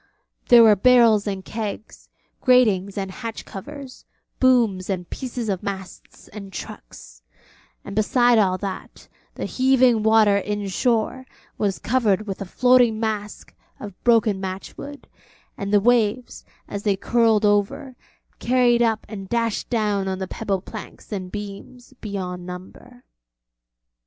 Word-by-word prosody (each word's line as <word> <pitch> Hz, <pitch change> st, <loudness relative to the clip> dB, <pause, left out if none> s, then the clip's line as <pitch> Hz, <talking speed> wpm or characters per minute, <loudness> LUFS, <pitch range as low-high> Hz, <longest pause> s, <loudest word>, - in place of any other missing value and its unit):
There 240 Hz, -1 st, +8 dB
were 215 Hz, -2 st, +7 dB
barrels 230 Hz, -1 st, +4 dB
and 195 Hz, -2 st, -4 dB
kegs, 215 Hz, -1 st, -7 dB, 0.3 s
gratings 210 Hz, -7 st, +3 dB
and 195 Hz, -1 st, -3 dB
hatch 230 Hz, +2 st, -7 dB
covers, 270 Hz, +6 st, -10 dB, 0.4 s
booms 230 Hz, -8 st, +2 dB
and 180 Hz, -3 st, -3 dB
pieces 245 Hz, -3 st, -5 dB
of 195 Hz, -3 st, -2 dB
masts 190 Hz, -2 st, -8 dB
and 200 Hz, -2 st, -10 dB
trucks; -, -, -10 dB, 0.6 s
and 200 Hz, -, -7 dB
beside 240 Hz, +2 st, +3 dB
all 185 Hz, -3 st, +2 dB
that, 195 Hz, 0 st, -7 dB, 0.3 s
the -, -, -4 dB
heaving 255 Hz, -3 st, +3 dB
water 215 Hz, -2 st, +4 dB
in 205 Hz, 0 st, -3 dB
shore 235 Hz, +5 st, -1 dB, 0.3 s
was 200 Hz, -2 st, 0 dB
covered 215 Hz, -5 st, 0 dB
with 195 Hz, -2 st, -6 dB
a -, -, -3 dB
floating 245 Hz, +2 st, +3 dB
mask 215 Hz, -2 st, -4 dB, 0.3 s
of 200 Hz, -3 st, -10 dB
broken 220 Hz, -5 st, +3 dB
match 190 Hz, 0 st, -6 dB
wood, 285 Hz, 0 st, -10 dB, 0.5 s
and 200 Hz, 0 st, -5 dB
the 205 Hz, -, +5 dB
waves, 240 Hz, +1 st, 0 dB, 0.2 s
as 200 Hz, -, -5 dB
they 205 Hz, -1 st, +1 dB
curled 225 Hz, 0 st, +2 dB
over, 205 Hz, +5 st, 0 dB, 0.4 s
carried 245 Hz, -1 st, +3 dB
up 225 Hz, -2 st, +1 dB
and 195 Hz, -3 st, -8 dB
dashed 230 Hz, -2 st, -1 dB
down 210 Hz, -4 st, 0 dB
on 190 Hz, 0 st, -2 dB
the 190 Hz, 0 st, -4 dB
pebble 195 Hz, -3 st, -3 dB
planks -, -, -11 dB
and 185 Hz, -3 st, -5 dB
beams 210 Hz, +5 st, -9 dB
beyond 185 Hz, -4 st, -5 dB
number. 185 Hz, +8 st, -11 dB
215 Hz, 135 wpm, -22 LUFS, 195-240 Hz, 0.6 s, There